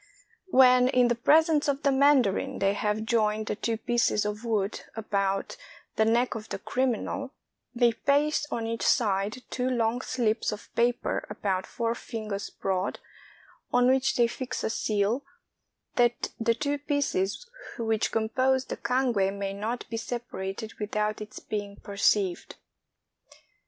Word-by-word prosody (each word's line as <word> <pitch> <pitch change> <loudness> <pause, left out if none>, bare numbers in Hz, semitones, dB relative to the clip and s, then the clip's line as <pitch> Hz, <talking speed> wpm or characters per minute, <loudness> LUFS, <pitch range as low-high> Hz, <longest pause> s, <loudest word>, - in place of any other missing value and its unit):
When, 255 -5 +6
in 250 -1 +3
the - - +3
presence 300 +5 +4
of 280 0 -1
the 280 - +4
mandarin, 265 -2 +3
they 195 0 +2
have 210 +1 -1
joined 215 -1 +1
the - - -2
two 225 +2 -2
pieces 235 -3 +1
of 210 +2 -3
wood 215 -3 -1
about 195 -3 -1 0.4
the 220 - +3
neck 235 +3 +2
of 215 -2 -7
the - - -3
criminal, 260 +5 -2 0.4
they 235 -1 +4
paste 290 +5 +1
on 230 - -2
each 230 0 -3
side 210 0 +1
two 250 0 -1
long 240 0 0
slips 230 -4 0
of 210 -1 -9
paper 240 +1 0
about 195 -3 -2
four 230 -1 -1
fingers 215 -4 -5
broad, 190 0 -2 0.7
on 245 0 +4
which 265 0 +2
they 240 - +4
fix 250 +2 -4
a - - 0
seal, 215 +5 0 0.7
that 240 0 +2
the 230 0 +2
two 290 +2 -1
pieces 285 - -1 0.3
which 225 -2 0
compose 260 +4 +1
the - - -5
cangue 235 -6 +1
may 195 -1 -3
not 220 +5 -4
be 225 - -2
separated 225 -3 -5
without 210 0 -1
its 215 0 -8
being 205 -1 -5
perceived. 200 -2 0
230 Hz, 145 wpm, -27 LUFS, 210-255 Hz, 0.7 s, When